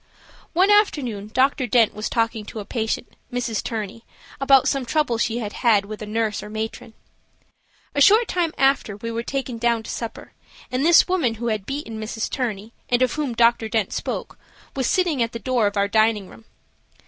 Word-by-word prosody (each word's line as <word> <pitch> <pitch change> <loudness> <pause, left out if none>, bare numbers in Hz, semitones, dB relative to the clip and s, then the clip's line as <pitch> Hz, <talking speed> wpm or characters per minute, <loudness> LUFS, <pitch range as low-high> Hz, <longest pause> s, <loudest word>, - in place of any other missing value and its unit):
One 375 +4 +4
afternoon, 265 - +2
Dr. 260 +1 +2
Dent 230 -1 +4
was 215 +1 -4
talking 225 -1 0
to 220 - -7
a 205 - -6
patient, 225 +2 -3 0.2
Mrs. 245 -3 -2
Turney, 220 0 -5 0.4
about 275 -1 +5
some 275 -2 0
trouble 245 -2 0
she 230 0 0
had 210 -3 -4
had 220 -5 +3
with 215 +1 -8
a 215 - -6
nurse 215 -1 -1
or 210 - -9
matron. 220 +1 -6 1.0
A 285 - 0
short 430 - +6
time 345 -3 0
after 270 -7 +2
we 230 +2 -5
were 230 0 -2
taken 255 -1 -4
down 235 -1 +1
to - - -6
supper 230 -2 -6 0.4
and 255 +2 0
this 340 +1 +6
woman 330 -12 +1
who 235 +1 -3
had 215 -3 -3
beaten 275 -6 -5
Mrs. 220 0 -4
Turney, 225 -3 -3 0.2
and 245 +1 +3
of 255 - +1
whom 290 -6 -2
Dr. 230 -1 +3
Dent 220 -3 0
spoke, - - -4 0.4
was 265 -3 0
sitting 345 -8 +1
at 230 0 0
the - - -3
door 240 -2 +1
of 205 0 -3
our 200 0 +2
dining 215 -1 +2
room. 225 - -15
230 Hz, 195 wpm, -22 LUFS, 220-270 Hz, 1.0 s, short